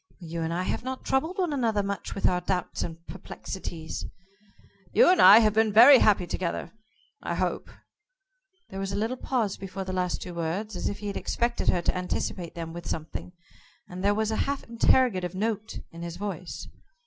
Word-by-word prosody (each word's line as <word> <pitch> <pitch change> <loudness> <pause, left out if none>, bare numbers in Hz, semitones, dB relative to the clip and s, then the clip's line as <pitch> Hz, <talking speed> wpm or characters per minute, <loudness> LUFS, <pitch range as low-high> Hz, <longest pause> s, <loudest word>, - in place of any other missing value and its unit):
"You 165 0 -5
and 165 0 -2
I 175 +2 -1
have 185 - -2
not 260 0 -5
troubled 320 +8 0
one 355 -5 0
another 225 -6 +1
much 200 0 -4
with 195 - +2
our 180 -1 +1
doubts 180 0 -2
and 165 0 -6
perplexities." 175 -3 -7 0.9
"You - - +6
and 370 - +4
I 210 - +10
have 215 -2 +3
been 220 0 +3
very 245 +6 +9
happy 200 -4 +4
together 175 0 -3 0.5
I - - -3
hope." - - -2 1.0
There 195 - -5
was 195 0 -3
a - - -3
little 225 +5 -1
pause 240 -6 -1
before 195 0 -6
the 185 0 -5
last 180 -1 -1
two 180 - -7
words, 175 +6 -3
as - - -2
if 200 - -5
he 210 - -9
had 200 -1 -3
expected 235 0 -1
her 175 - +2
to - - 0
anticipate 180 -1 -3
them 165 -1 -6
with 175 0 -7
something, 165 +3 -5 0.5
and 180 +1 -7
there 205 +1 +3
was 220 0 0
a 220 - -1
half 280 -1 -2
interrogative 230 -6 +2
note 215 +1 -2
in 170 - -10
his 170 0 -6
voice. 185 -3 -5
195 Hz, 195 wpm, -27 LUFS, 180-220 Hz, 1.0 s, I